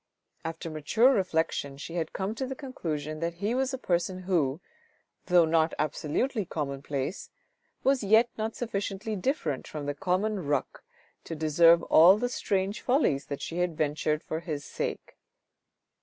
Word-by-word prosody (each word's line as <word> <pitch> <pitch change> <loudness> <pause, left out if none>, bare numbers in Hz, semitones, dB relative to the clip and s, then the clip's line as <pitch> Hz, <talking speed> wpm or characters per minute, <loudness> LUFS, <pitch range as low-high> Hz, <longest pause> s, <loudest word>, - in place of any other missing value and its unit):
After 165 +1 -5
mature 220 - +3
reflection, 160 - -1
she 155 +3 -7
had 165 -2 -2
come 195 +2 -3
to 260 +3 -3
the 265 - -5
conclusion 155 - -4
that 170 +1 -2
he 205 +6 -1
was 265 +1 0
a 265 - -3
person 185 -3 -1
who, 160 -6 +1 0.7
though 175 -2 +6
not 160 0 +2
absolutely 155 - -1
commonplace, 140 -1 -4 0.5
was 270 -3 +2
yet 220 +4 +5
not 220 +1 -3
sufficiently 210 -2 -3
different 180 - -2
from 150 -2 -6
the 145 - -1
common 190 +5 -1
ruck 145 - -1 0.4
to 165 - -5
deserve 165 +2 +5
all 175 +5 +7
the 245 +3 -1
strange 200 -3 -1
follies 245 - +1
that 140 - -5
she 170 - -4
had 175 -3 -1
ventured 150 0 0
for 160 - -3
his 155 -4 -5
sake. - - -5
170 Hz, 155 wpm, -28 LUFS, 155-215 Hz, 0.7 s, all